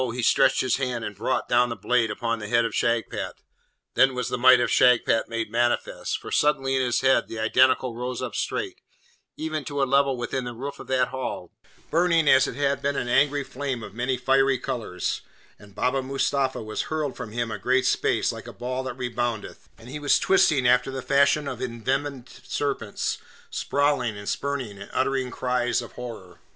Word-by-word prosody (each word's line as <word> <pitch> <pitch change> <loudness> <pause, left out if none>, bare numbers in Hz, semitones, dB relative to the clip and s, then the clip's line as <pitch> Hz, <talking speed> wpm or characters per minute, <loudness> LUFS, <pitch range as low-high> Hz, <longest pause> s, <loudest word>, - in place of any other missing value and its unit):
he 125 - -3
stretched - - +4
his 130 -2 +1
hand 125 -4 -2
and 105 - -6
brought 110 +6 -1
down 120 0 +3
the 115 - -3
blade 125 -2 +1
upon 115 +2 -2
the 105 - -6
head 115 +1 +3
of 115 - -3
Shagpat. 115 -1 -1 0.6
Then 135 -1 +4
was 125 -2 -2
the - - -1
might 130 0 +7
of 120 - 0
Shagpat 125 -2 +4
made 115 -2 -3
manifest, 120 +1 0
for - - -10
suddenly 135 -2 +2
in 130 - +2
his 120 -2 +1
head 130 0 +3
the 115 - -7
Identical 125 +2 +3
rose 125 0 -4
up - - -4
straight, - - -3 0.6
even 155 -1 -3
to 145 -1 -4
a - - +3
level 135 0 +2
with 120 - -4
the 130 - -1
roof 140 +4 -6
of - - -10
that 130 -1 +1
hall, 130 0 -5 0.4
burning 165 -1 +3
as 130 -1 +6
it - - -5
had 140 0 0
been 140 0 0
an - - -2
angry 140 +3 +3
flame 135 -2 -4
of - - -9
many 125 +3 -1
fiery 135 0 +3
colours, 120 -8 -3 0.4
and 100 -2 -16
Baba 135 +1 0
Mustapha 135 -1 -1
was 110 0 -4
hurled 155 -4 -2
from 120 -4 -7
him 115 0 -2
a 105 - -4
great 130 +4 +2
space - - +1
like - - -9
a - - -8
ball 125 +1 -3
that 130 -1 -5
reboundeth, 120 -3 -4
and 115 - -14
he 145 +4 -6
was 145 -1 +3
twisting 150 -9 +3
after 125 +1 +3
the 135 -1 -5
fashion 140 +1 +3
of - - -5
envenomed 130 +2 -3 0.2
serpents, 125 -4 -2 0.3
sprawling 140 -6 0
and 100 0 -9
spurning, 130 -8 -3
and 100 - -9
uttering 130 0 0
cries 125 -1 0
of 120 - -7
horror. 110 -8 -9
125 Hz, 195 wpm, -25 LUFS, 120-135 Hz, 0.6 s, might